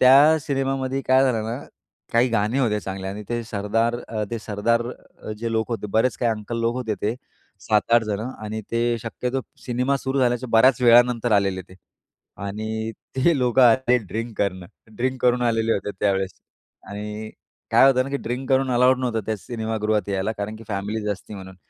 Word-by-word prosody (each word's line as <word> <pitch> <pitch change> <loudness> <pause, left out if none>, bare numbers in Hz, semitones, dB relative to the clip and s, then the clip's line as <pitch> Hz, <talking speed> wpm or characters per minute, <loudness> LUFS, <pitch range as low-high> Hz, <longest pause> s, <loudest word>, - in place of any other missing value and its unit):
त्या 140 +5 +7
सिनेमामध्ये 135 -1 -1
काय 130 0 +6
झालं 115 -4 +1
ना? 115 +3 -3 0.5
काही 120 +2 +4
गाणी 115 +2 0
होत्या 110 -6 +1
चांगल्या 95 -1 -5
आणि 105 +2 -6
ते 120 0 -2
सरदार, 115 +2 0
अ, 110 -1 -2
ते 115 - -2
सरदार 110 +2 0 0.6
जे 115 0 -3
लोकं 110 +1 0
होते, 105 - -5
बरेच 115 +3 +2
काही 120 - +2
अंकल 110 +2 -5
लोक 115 +1 +1
होते 115 -4 -2
ते 105 +3 0 0.5
7-8 115 +2 +3
जणं 110 +3 -3
आणि 110 +1 -4
ते 120 0 +1
शक्यतो 125 +4 -3 0.2
सिनेमा 125 +2 0
सुरू 135 0 -2
झाल्याच्या 125 0 +1
बऱ्याच 125 +3 +5
वेळानंतर 120 -1 +5
आलेले 100 -2 +2
ते. 95 - -14 0.6
आणि 110 +3 -4 0.2
ते 150 +5 +3
लोकं 125 +1 +3
आले 125 +1 +5
ड्रिंक 115 +1 -5
करणं, 95 -3 -1 0.3
ड्रिंक 130 +1 -1
करून 125 0 +3
आलेले 115 -1 +2
होते 100 0 -2
त्यावेळेस. 95 -2 0 0.5
आणि 105 +1 -6 0.4
काय - - +6
होतं 130 -1 +2
ना 135 - -6
की 140 - 0
ड्रिंक 130 +2 -3
करून 130 0 +3
अलाउड 125 +1 +4
नव्हतं 120 -3 -1
त्या 110 - -1
सिनेमागृहात 110 -1 -2
यायला 100 +2 -1
कारण 105 +2 -4
की 115 - -12
फॅमिलीज 105 +1 -3
असती 100 +1 -6
म्हणून. 95 -1 -9
115 Hz, 175 wpm, -23 LUFS, 105-125 Hz, 0.6 s, त्या